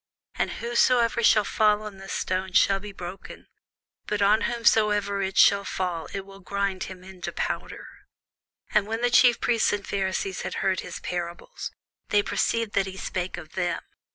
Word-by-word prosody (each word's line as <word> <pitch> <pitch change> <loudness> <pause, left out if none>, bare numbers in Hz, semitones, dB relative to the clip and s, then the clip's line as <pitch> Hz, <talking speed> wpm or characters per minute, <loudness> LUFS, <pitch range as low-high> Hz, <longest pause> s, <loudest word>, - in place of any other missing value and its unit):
And - - -1
whosoever 235 0 +2
shall 215 -2 +5
fall 210 0 +2
on 210 -2 -8
this 195 0 -8
stone 185 0 -2
shall 195 +1 +4
be 205 +1 -8
broken: 185 0 -9 0.6
but 210 - -1
on 205 +2 +4
whomsoever 210 -4 +2
it 190 0 -3
shall 200 0 +6
fall, 180 -4 -3
it 195 - -3
will 195 0 -13
grind 195 -1 -2
him 185 0 -11
to - - -3
powder. - - -4 0.9
And 210 -1 +3
when 225 +1 -3
the 245 0 +2
chief 245 -1 +6
priests 230 -2 +2
and 205 -1 -2
Pharisees 190 -1 -2
had - - -4
heard 190 -1 +2
his - - -7
parables, 175 - -5 0.4
they 205 0 +3
perceived 230 0 0
that 195 -1 +1
he 190 0 -7
spake 185 -1 -3
of 160 -3 -10
them. 175 -2 -1
200 Hz, 170 wpm, -26 LUFS, 190-215 Hz, 0.9 s, shall